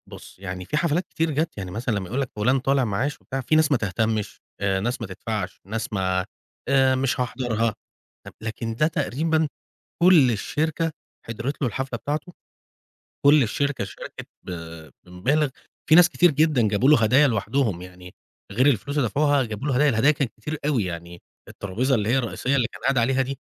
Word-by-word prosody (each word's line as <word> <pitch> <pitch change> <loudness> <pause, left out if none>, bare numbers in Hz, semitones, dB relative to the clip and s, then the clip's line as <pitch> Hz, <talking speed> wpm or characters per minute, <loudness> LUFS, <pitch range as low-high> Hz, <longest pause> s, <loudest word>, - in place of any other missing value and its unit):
بُص، - - -13
يعني 90 -1 -6
في 150 - -2
حفلات 170 +2 0
كتير 160 0 -1
جات 155 0 -2
يعني، 95 -3 -5
مثلًا 115 +4 -2
لمّا 95 -2 -3
يقول 125 +8 -2
لَك 130 - -3
فُلان 125 +6 +2
طالع 135 +1 +2
معاش 120 +8 -2
وبتاع، 135 0 -4
في 145 +5 +1
ناس 155 -1 +4
ما 140 - +4
تهتمش، 110 +1 -2 0.2
آآ 95 -1 +1
ناس 120 +5 -2
ما 115 - -4
تدفعش، 100 +1 -5
ناس 110 +2 -4
ما 95 -2 0 0.4
آآ 130 -1 +4
مش 130 +1 0
هاحضرها، 115 -3 -1 0.7
لكن 115 +1 -4
ده 155 +6 +3
تقريبًا 160 +1 0 0.6
كُل 170 -8 +7
الشركة 160 +8 -1 0.3
حضرِت 115 +6 -4
له 130 - +2
الحفلة 130 +1 -4
بتاعته، 150 +7 -4 0.9
كُل 145 0 +7
الشركة 140 +1 -1
شاركِت 100 - -9
ب - - -9 0.6
بمبالغ، 135 +13 0 0.4
في 155 - +6
ناس 175 +1 +8
كتير 175 -1 +4
جدًا 150 -6 +2
جابوا 105 +6 +2
له 150 -6 +6
هدايا 130 +7 +5
لوحدهم، 110 -4 0
يعني 90 0 -12 0.4
غير 125 +7 +2
الفلوس 140 +2 +1
اللي 125 -5 +2
دفعوها 145 +4 +2
جابوا 110 +4 -5
له 135 - +1
هدايا، 145 +4 +4
الهدايا 130 +6 +4
كانت 140 -5 -2
كتير 155 0 -4
أوي، 135 -8 +1
يعني 85 0 -7 0.3
الترابيزة 120 +8 -1
اللي 105 -3 0
هي 130 +3 +3
الرئيسية 130 +2 -1
اللي 125 -4 +2
كان - - -12
قاعد 135 -1 +2
عليها 130 +3 +2
دي، 135 0 -5
125 Hz, 185 wpm, -24 LUFS, 105-145 Hz, 0.9 s, ناس